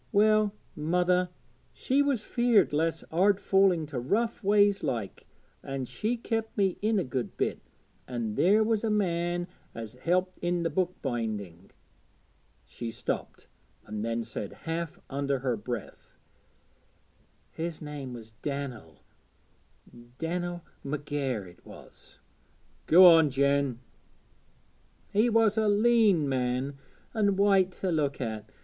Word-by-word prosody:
Well, 215 0 +3 0.2
mother, 180 +3 +1 0.4
she 275 +2 +1
was 275 -6 +1
feared 235 -10 +3
lest 160 +2 0
I'd 195 +3 +3
fall 195 -1 +4
into 155 -6 -3
rough 220 - -1
ways 205 0 +4
like, 110 -6 -4 0.3
an' 135 -1 -4
she 220 - -2
kep' 225 -1 -2
me 195 -3 +1
in 215 +1 +2
a 190 - +1
good 125 -2 -4
bit, - - -1 0.5
an' 120 -4 -3
there 205 - +4
was 220 -1 0
a 225 - +1
man 175 -4 0 0.3
as 115 -2 -6
helped 180 +8 -1
i' 175 0 0
the 165 - -1
book 185 -1 0
binding 105 - -4 0.5
' - - -38
she 120 - -6
stopped, 115 - -5 0.4
and 105 0 -5
then 115 0 -1
said 110 -3 -6
half 165 -1 -3
under 140 0 -1
her 125 -2 -1
breath 115 0 -7 1.3
'His 165 -1 -4
name 145 -4 -7
was 115 -2 -10
Dan'el, 130 - -5 1.1
Dan'el 175 +1 -3 0.2
McGair, 140 -6 -3
it 90 0 -17
was.' - - -12 0.7
'Go 180 +3 +8
on, 165 -3 +8
Jen.' 140 -1 +1 1.4
'He 215 +4 +4
was 225 -1 +3
a 215 -1 +2
leän 210 -5 +4
man 130 +1 -1 0.3
and 205 -4 +2
white 195 -2 +4
to 185 0 -2
look 145 -4 0
at. 110 -4 -4
165 Hz, 130 wpm, -28 LUFS, 130-200 Hz, 1.4 s, Go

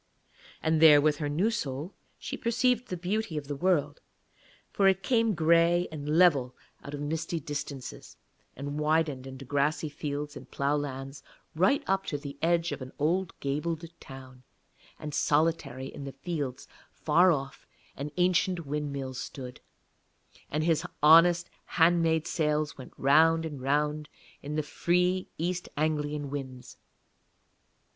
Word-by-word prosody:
And 160 0 +2
there 150 -2 +9
with 150 0 +2
her 145 -1 -2
new 180 +10 +1
soul 150 - -4 0.2
she - - -5
perceived 250 +1 +1
the 180 - -4
beauty 185 0 -2
of 145 - -4
the 145 - -3
world; 150 -3 0 0.7
for 195 - +3
it 190 0 +2
came 230 -4 +2
grey 170 +2 +3
and 150 0 -2
level 140 -9 +4 0.3
out 145 - -6
of 145 - -6
misty 160 +3 -2
distances, 140 -2 -7 0.4
and 145 +2 -5
widened 150 -4 0
into 135 +1 -9
grassy 145 +3 0
fields 145 0 -5
and - - -11
ploughlands 140 -1 -2 0.3
right 200 - +3
up 195 0 0
to 145 - -2
the 140 -1 -8
edge 170 +1 +2
of - - -5
an 130 0 -7
old 175 +5 -1
gabled 155 +4 -2
town; 130 -1 -12 0.6
and 150 -1 -7
solitary 150 -4 +1
in - - -8
the 135 - -7
fields 140 -3 -5 0.2
far 175 +4 +4
off 140 -3 -4 0.3
an 140 +2 -5
ancient 180 -1 +2
windmill 140 -2 -3
stood, 125 0 -7 0.9
and 150 +2 -1
his 165 -1 +2 0.2
honest 170 +3 +7 0.3
hand 170 +1 +5
made 160 -1 +1
sails 150 -2 0
went 130 - -11
round 160 +4 +4
and 145 -4 -6
round 150 +2 0 0.3
in 145 +1 -5
the 155 - 0
free 180 +4 0
East 175 +2 -2
Anglian 150 -2 -1
winds. 130 -3 -7
150 Hz, 145 wpm, -29 LUFS, 140-170 Hz, 0.9 s, there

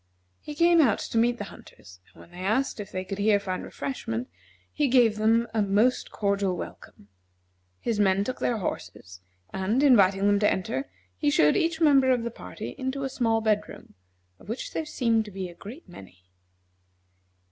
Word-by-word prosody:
He 295 - -9
came 340 +1 +5
out 245 -8 +3
to - - -4
meet 240 +1 +2
the 205 - -5
hunters, 90 -2 -16 0.2
and - - -15
when - - -17
they 175 - -12
asked 230 +6 0
if 205 - -7
they 185 0 -3
could 195 +2 -6
here 205 0 +3
find 185 -2 -4
refreshment, 125 - -5 0.4
he 295 - +1
gave 240 -4 +4
them 225 +2 +2
a 220 - +1
most 210 +5 +2
cordial 200 -3 -1
welcome. 100 - -10 0.7
His 225 -3 -2
men 195 -1 +3
took 255 +5 -5
their 240 - 0
horses, 90 - -6 0.3
and, 205 +8 0
inviting 200 -7 +5
them 205 0 +3
to 205 - +3
enter, 140 -8 -3 0.3
he 95 - 0
showed 150 +1 +4
each 330 -1 0
member 280 -5 +5
of 250 -2 +2
the 235 - -3
party - - -8
into 265 +1 -3
a 270 - -2
small 225 -3 0
bedroom, 210 -1 -2 0.5
of - - -16
which 230 - -5
there 320 - -2
seemed 230 -6 +1
to 210 - -10
be 190 -1 -5
a - - -11
great 225 - -11
many. 95 - -14
215 Hz, 185 wpm, -26 LUFS, 190-250 Hz, 0.7 s, came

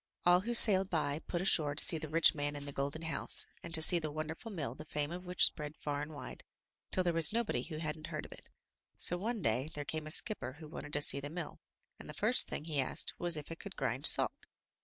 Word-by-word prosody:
All 175 0 +6
who 235 +5 -3
sailed 195 -4 +5
by 150 -3 -1
put 175 - -2
ashore 150 -6 +2
to - - +4
see 165 - +5
the 155 -1 -7
rich 165 +2 +5
man 145 -1 -3
in 145 0 -7
the 145 - -6
golden 140 +4 -4
house, 165 - 0 0.2
and 170 - -9
to 160 - +3
see 175 +2 +3
the 155 -2 -4
wonderful 155 +8 -6
mill 150 - -5
the 155 - -10
fame 150 0 -3
of 180 +1 -7
which 180 0 +2
spread 150 0 -1
far 145 -1 -4
and 150 +2 -6
wide, 145 - -9 0.5
till 185 - +1
there 175 -1 0
was 165 -2 +4
nobody 220 - -1
who 155 +3 -7
hadn't 155 0 -5
heard 155 -3 -5
of - - -13
it. - - -14 0.5
So 175 - +4
one 215 +2 -4
day 125 +7 0
there 145 -1 -5
came 155 +1 -4
a - - -5
skipper 155 - +2
who 155 +2 -12
wanted 145 -1 -9
to 150 - +1
see 140 - +4
the 145 +1 -6
mill, 165 0 -7 0.4
and - - -11
the - - -8
first - - +3
thing 150 - -6
he 150 -4 -1
asked 130 - 0
was 175 -2 +2
if 150 +2 -8
it 165 - -7
could 200 -2 -9
grind 125 +4 +1
salt. - - +3
155 Hz, 255 wpm, -33 LUFS, 145-175 Hz, 0.5 s, All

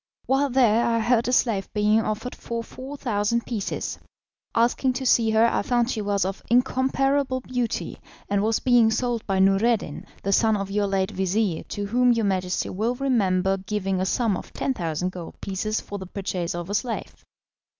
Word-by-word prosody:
While 275 +2 +2
there 240 -3 +4
I 230 -1 +2
heard 230 +1 +2
a - - +1
slave 225 -6 +1
being 210 +1 +3
offered 220 +3 -3
for 230 0 -5
4,000 235 -4 -2
pieces. 220 -5 -3 0.6
Asking 245 +3 +2
to 265 +1 -4
see 230 -3 +4
her, 220 +1 +4
I 235 - +1
found 240 0 +1
she 220 - -2
was 200 -2 0
of 195 +1 -4
incomparable 260 +2 +2
beauty, 245 -2 -3 0.3
and 200 0 +1
was 220 +1 +2
being 240 -3 +4
sold 240 0 -1
by 195 -2 0
Noureddin, 195 +4 +2 0.2
the 200 - +1
son 220 +1 +3
of 195 -1 -4
your 205 0 +1
late 195 0 0
vizir, 190 -2 0
to 205 - -4
whom 245 +4 +3
your 230 -2 0
Majesty 185 -2 -1
will 225 +6 -1
remember 195 -8 +1
giving 195 -1 -2
a - - +1
sum 225 -1 +1
of - - -8
10,000 180 - -2
gold 175 -2 -9
pieces 215 +3 -2
for 205 - -7
the 190 - -8
purchase 180 -3 -3
of 175 +2 -5
a - - -2
slave. 230 +2 -3
220 Hz, 180 wpm, -24 LUFS, 195-245 Hz, 0.6 s, there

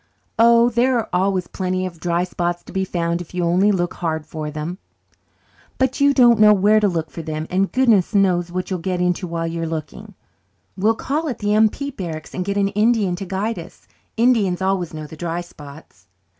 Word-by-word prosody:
"Oh, 235 +1 +6
there 245 +2 +2
are 230 - -2
always 185 0 +1
plenty 185 +1 -2
of 170 -3 -7
dry 170 +1 0
spots 175 -1 -3
to - - -13
be 190 -1 0
found 170 -1 -2
if 175 +1 -11
you 180 - 0
only 180 +5 +3
look 175 -2 -1
hard 160 -3 -3
for 155 -1 -5
them." 155 +5 -5 1.0
"But 260 +2 0
you 285 0 +6
don't 240 -4 +5
know 210 0 +7
where 205 +3 +4
to 210 - +2
look 165 -4 -2
for 165 - -6
them, 155 0 -4
and 190 +2 +1
goodness 225 -6 +2
knows 180 -3 +2
what 185 +2 -4
you'll 185 - -1
get 180 +1 -2
into 180 +1 0
while 165 0 -3
you 165 0 -3
are 165 - -2
looking." 160 -1 -7 0.6
"We'll 210 +4 +2
call 305 +7 -2
at 250 - -4
the 205 0 0
M.P. 220 +7 +2
barracks 165 - -7
and 185 - -2
get 200 +2 -2
an 200 -1 +2
Indian 210 -2 +1
to 195 - -5
guide 195 +2 -2
us. 170 +2 -13 0.3
Indians 225 -7 +2
always 190 -3 -1
know 155 -1 -7
the 155 - -11
dry 170 +2 -3
spots." 145 - -14
185 Hz, 210 wpm, -20 LUFS, 170-210 Hz, 1.0 s, know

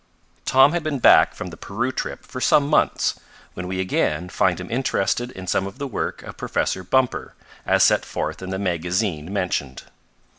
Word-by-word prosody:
Tom 135 +2 +6
had 175 - 0
been 155 -2 -2
back 125 - +6
from 90 - -6
the 85 - -10
Peru 120 +8 -2
trip - - -5
for 130 - -7
some 140 +1 +4
months, 150 - +1 0.3
when 90 0 -6
we 95 0 -3
again 90 -2 0
find - - +1
him - - -8
interested 120 -1 0
in 95 - -8
some 95 +2 0
of 100 - -10
the 140 - -4
work 130 - -4
of - - -10
Professor 95 - -1
Bumper, 130 +7 0 0.3
as - - +4
set - - +4
forth - - -4
in 95 - -6
the 95 - -2
magazine 90 -2 -1
mentioned. 85 -9 -2
95 Hz, 185 wpm, -22 LUFS, 90-130 Hz, 0.3 s, Tom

